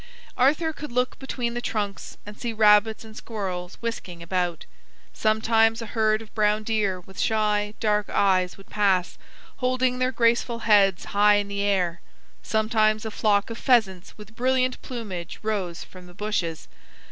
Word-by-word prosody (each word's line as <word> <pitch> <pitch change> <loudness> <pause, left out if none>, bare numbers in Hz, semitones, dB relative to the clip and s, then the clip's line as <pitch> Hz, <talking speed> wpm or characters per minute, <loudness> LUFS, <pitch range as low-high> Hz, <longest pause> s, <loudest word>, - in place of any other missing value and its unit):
Arthur 305 +5 +2
could 300 -2 -8
look 250 +1 -1
between 245 -3 -3
the 240 - -3
trunks 205 -4 -4
and 210 0 -9
see 235 +1 -4
rabbits 215 +1 +4
and 220 -1 -13
squirrels 185 -6 -5
whisking 185 -7 -5
about. 175 -1 -2 0.5
Sometimes 225 +1 +2
a 230 - -5
herd 220 0 +1
of 215 - -19
brown 210 0 +1
deer 210 -4 0
with 190 +1 -13
shy 210 -1 0
dark 210 -2 +1
eyes 185 -2 +2
would 195 - -15
pass, 195 -4 +1 0.4
holding 255 -1 0
their 255 0 +1
graceful 235 -1 +1
heads 200 -4 +4
high 205 +1 +5
in 205 -1 -1
the 200 0 -3
air; 185 -4 0 0.4
sometimes 215 0 +1
a 220 - -4
flock 205 0 +1
of 230 - -6
pheasants 210 -9 +1
with 215 +1 -13
brilliant 255 +1 +1
plumage 200 -9 -6
rose 195 -6 -2
from 180 -1 -14
the 175 - -15
bushes. 190 -6 -3
215 Hz, 160 wpm, -25 LUFS, 195-230 Hz, 0.5 s, high